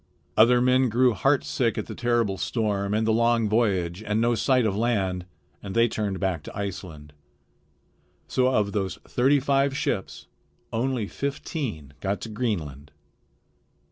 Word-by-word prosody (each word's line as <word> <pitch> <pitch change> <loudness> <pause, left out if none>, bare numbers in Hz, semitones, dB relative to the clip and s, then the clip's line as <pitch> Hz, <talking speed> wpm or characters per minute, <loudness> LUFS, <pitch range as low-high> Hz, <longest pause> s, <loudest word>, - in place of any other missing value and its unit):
Other 120 +2 +5
men 130 0 +3
grew 125 +2 +3
heartsick 125 0 +1
at - - -2
the - - -7
terrible 120 -5 0
storm 100 -4 -1
and 110 +1 +1
the 110 - +2
long 115 0 +2
voyage 100 -5 0
and 105 0 -1
no 120 +1 +2
sight 125 +1 +2
of 100 -3 0
land, 95 -5 0 0.3
and 100 0 -7
they 115 0 +5
turned 105 -4 -3
back 95 -5 -1
to - - -10
Iceland. 85 -7 -6 1.1
So 130 0 +2
of 105 -6 +1
those 100 -3 -2
thirty 135 +3 +3
five 140 0 +1
ships 95 - -3 0.5
only 120 -2 -1
fifteen 135 - -4
got 100 +5 -2
to 115 - -6
Greenland. 85 - -3
110 Hz, 145 wpm, -25 LUFS, 95-125 Hz, 1.1 s, Other